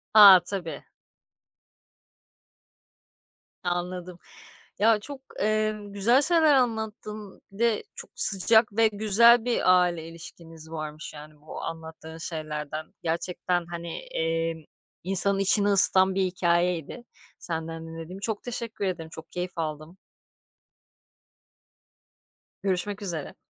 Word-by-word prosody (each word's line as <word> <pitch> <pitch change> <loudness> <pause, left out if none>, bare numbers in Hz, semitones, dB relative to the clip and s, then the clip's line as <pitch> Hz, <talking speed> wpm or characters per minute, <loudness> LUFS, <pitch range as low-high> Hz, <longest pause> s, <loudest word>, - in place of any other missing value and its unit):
A. 200 -4 +9
tabii. 175 -6 -6 2.8
Anladım. 180 0 -5 0.6
Ya 220 0 +3
çok, 275 +5 -7 0.2
eee, 215 +1 0
güzel 205 +6 +2
şeyler 320 -1 +3
anlattın 220 -4 -3
bir 195 - -15
de 230 -2 0
çok - - -11
sıcak 215 +2 +4
ve 225 0 +5
güzel 220 +3 +5
bir 185 -7 +3
aile 170 -2 -3
ilişkiniz 165 -1 -12
varmış 155 -1 -7
yani 150 0 -14
bu 155 - -9
anlattığın 160 0 -9
şeylerden. 155 -1 -6
Gerçekten 175 +1 -2
hani, 170 0 -7 0.2
eee, 165 -1 -2 0.4
insanın 195 +2 +3
içini 200 +1 +3
ısıtan 190 -1 +7
bir 195 - +1
hikâyeydi 175 +2 -1 0.4
senden 165 -1 -6
dinlediğim. 165 +3 -9
Çok 210 0 -4
teşekkür 230 -4 -5
ederim. 165 -4 -5
Çok 160 0 -12
keyif 180 0 -5
aldım. 155 +2 -6 2.7
Görüşmek 200 +2 -1
üzere. 170 -7 -5
180 Hz, 105 wpm, -25 LUFS, 165-210 Hz, 2.8 s, A